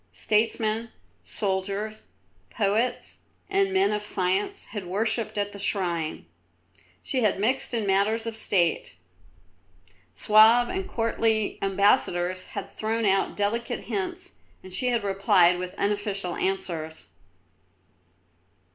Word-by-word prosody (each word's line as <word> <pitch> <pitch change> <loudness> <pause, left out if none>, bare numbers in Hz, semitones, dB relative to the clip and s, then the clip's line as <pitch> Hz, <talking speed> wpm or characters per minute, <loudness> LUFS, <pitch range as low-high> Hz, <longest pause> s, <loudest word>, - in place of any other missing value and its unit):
Statesmen, 220 +1 0 0.3
soldiers, 200 +2 -3 0.4
poets, 215 - -1 0.3
and 390 0 +2
men 385 +1 +3
of 210 0 -1
science 190 -1 -1
had 205 -5 -5
worshipped 220 +4 -1
at 205 0 -1
the 200 - -10
shrine. 175 - -2 0.8
She 265 - -1
had 210 -4 +2
mixed 250 +6 0
in 230 -3 -1
matters 200 +4 +1
of 230 -1 -4
State. 180 - 0 1.2
Suave 220 - +6
and 380 0 -4
courtly 225 - 0
ambassadors 185 -2 +2
had 195 - -5
thrown 220 +1 -2
out 195 -1 +1
delicate 215 +3 -1
hints, 370 -1 -4 0.3
and 185 - -10
she 250 +7 0
had 235 -3 +1
replied 195 -3 +3
with 180 0 -5
unofficial 200 -3 -1
answers. 170 -5 -3
205 Hz, 110 wpm, -26 LUFS, 190-225 Hz, 1.2 s, Suave